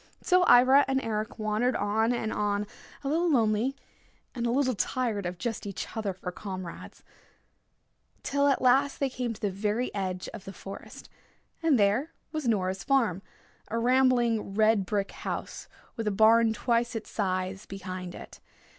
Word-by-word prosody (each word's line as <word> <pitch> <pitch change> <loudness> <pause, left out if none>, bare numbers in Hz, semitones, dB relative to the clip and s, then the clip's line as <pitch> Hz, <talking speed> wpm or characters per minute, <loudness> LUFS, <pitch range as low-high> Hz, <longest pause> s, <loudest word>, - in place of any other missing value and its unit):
So 365 -1 +4
Ivra 260 +3 +7
and 265 0 +1
Eric 215 0 -3
wandered 215 +3 0
on 220 +3 +1
and 225 -3 -2
on, 205 0 0 0.4
a - - -3
little 335 +4 +1
lonely, 230 -1 +2 0.6
a 240 - -5
little 255 +2 +1
tired 220 -3 -1
of 175 0 -5
just 225 +1 -4
each 195 -5 -6
other 215 -3 -1
for 180 -1 -6
comrades, 185 -2 -8 1.2
till 280 0 +1
at 275 -2 +2
last 270 +3 +3
they 275 -2 0
came 250 -2 -3
to 225 - -8
the 205 - -1
very 210 +5 -1
edge 185 -2 -3
of 210 -4 -9
the 195 - -8
forest, 195 +1 -10 0.5
and 320 -5 +4
there 215 +9 +2 0.2
was 310 -5 -3
Nora's 190 -3 0
farm, 235 -10 +2 0.5
a 230 - -3
rambling 240 -4 +2
red 215 -3 +3
brick 200 0 -1
house, - - -6 0.3
with 225 -2 -3
a - - +2
barn 225 +2 +5
twice 235 +1 0
its 225 - -6
size 185 -1 -2
behind 185 -2 -6
it. - - -11
220 Hz, 160 wpm, -28 LUFS, 200-255 Hz, 1.2 s, Ivra